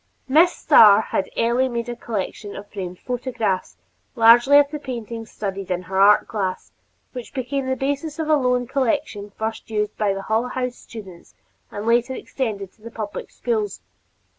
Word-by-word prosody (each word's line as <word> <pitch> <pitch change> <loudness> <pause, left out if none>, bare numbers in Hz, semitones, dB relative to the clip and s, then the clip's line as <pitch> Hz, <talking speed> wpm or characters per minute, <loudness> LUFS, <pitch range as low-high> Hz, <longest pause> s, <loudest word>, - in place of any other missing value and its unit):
Miss 320 +6 +5
Starr 205 -2 +7
had 205 -3 -2
early 240 +3 +2
made 235 -1 -3
a 240 - -4
collection 210 -2 -5
of 200 - -8
framed 180 -3 -6
photographs, 235 -6 -3 0.4
largely 240 +4 +7
of 290 - +7
the 300 - -4
paintings 230 -4 -6
studied 195 -2 -5
in 180 0 -2
her 190 +2 -1
art 205 +1 +6
class, 190 -4 -3 0.4
which 250 -2 -9
became 265 +1 -2
the 260 - +1
basis 285 +3 -3
of 320 -1 -2
a 310 - +3
loan 250 -3 +1
collection 225 -5 -1
first 220 +1 -4
used 210 -1 -2
by 210 -2 +2
the 195 - -5
Hull 220 +4 0
House 250 -1 -3
students 190 -6 -12 0.3
and 205 +1 -6
later 240 +2 +2
extended 210 -10 -4
to - - -30
the 230 - -9
public 215 -3 -6
schools. 435 -4 -2
230 Hz, 170 wpm, -22 LUFS, 205-260 Hz, 0.4 s, Starr